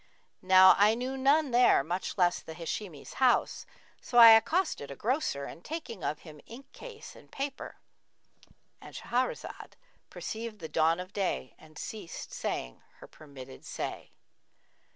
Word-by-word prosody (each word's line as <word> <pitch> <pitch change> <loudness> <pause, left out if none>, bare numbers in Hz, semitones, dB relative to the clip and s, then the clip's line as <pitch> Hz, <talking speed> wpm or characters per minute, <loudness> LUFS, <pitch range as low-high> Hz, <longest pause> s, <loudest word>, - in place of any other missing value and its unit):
Now 185 0 +7
I 210 +2 +5
knew 255 +3 -4
none 280 +2 +2
there 245 - +4
much 175 +7 -4
less 175 -2 +2
the 160 - -10
Hashimi's 165 -1 -6
house, 255 -2 +2 0.3
so 240 - -3
I 230 -1 +11
accosted 225 - +2
a 140 - -7
grocer 230 - -2
and 170 - -11
taking 280 - -7
of 150 - -3
him 150 -3 -13
inkcase 275 - -12
and - - -17
paper, 275 0 -5 0.5
— - - -31
And - - -12
Shahrazad 250 +2 -3 0.4
perceived 225 0 -6
the 160 - -7
dawn 165 +2 +2
of 185 +2 -8
day 190 -9 -2
and 155 -1 -17
ceased 205 -6 -8
saying - - -4
her - - -14
permitted 135 -4 -13
say. - - -6
205 Hz, 145 wpm, -29 LUFS, 160-255 Hz, 0.5 s, I